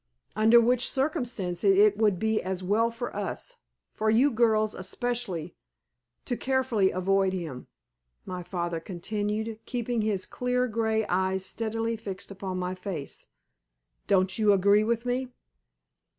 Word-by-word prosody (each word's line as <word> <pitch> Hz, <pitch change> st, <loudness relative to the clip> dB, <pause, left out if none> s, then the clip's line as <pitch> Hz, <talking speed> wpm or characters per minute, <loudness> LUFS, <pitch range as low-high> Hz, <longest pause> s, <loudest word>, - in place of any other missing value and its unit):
"Under 220 Hz, +3 st, +6 dB
which 245 Hz, +1 st, +2 dB
circumstances 225 Hz, -, 0 dB
it 205 Hz, 0 st, +6 dB
would 210 Hz, -3 st, +2 dB
be 220 Hz, +3 st, +1 dB
as 185 Hz, 0 st, -3 dB
well 215 Hz, +5 st, +2 dB
for 235 Hz, +1 st, -6 dB
us -, -, -4 dB, 0.4 s
for 220 Hz, 0 st, 0 dB
you 250 Hz, +6 st, +4 dB
girls 220 Hz, -2 st, +2 dB
especially 185 Hz, -4 st, -3 dB, 0.7 s
to 245 Hz, -, -1 dB
carefully 255 Hz, -7 st, +1 dB
avoid 190 Hz, +1 st, +1 dB
him," 160 Hz, -9 st, -5 dB, 0.6 s
my 180 Hz, -1 st, -5 dB
father 175 Hz, -1 st, -3 dB
continued, 210 Hz, +5 st, -3 dB
keeping 240 Hz, -1 st, -1 dB
his 210 Hz, -3 st, 0 dB
clear, 250 Hz, 0 st, 0 dB
grey 220 Hz, -1 st, 0 dB
eyes 190 Hz, 0 st, 0 dB
steadily 225 Hz, +2 st, -2 dB
fixed 200 Hz, -3 st, -6 dB
upon 190 Hz, -1 st, -5 dB
my 180 Hz, 0 st, -2 dB
face. 185 Hz, -6 st, -6 dB, 0.8 s
"Don't 190 Hz, 0 st, +2 dB
you 210 Hz, -2 st, +5 dB
agree 200 Hz, +2 st, +4 dB
with 230 Hz, +2 st, -1 dB
me?" 250 Hz, +1 st, -1 dB
215 Hz, 135 wpm, -27 LUFS, 190-230 Hz, 0.8 s, Under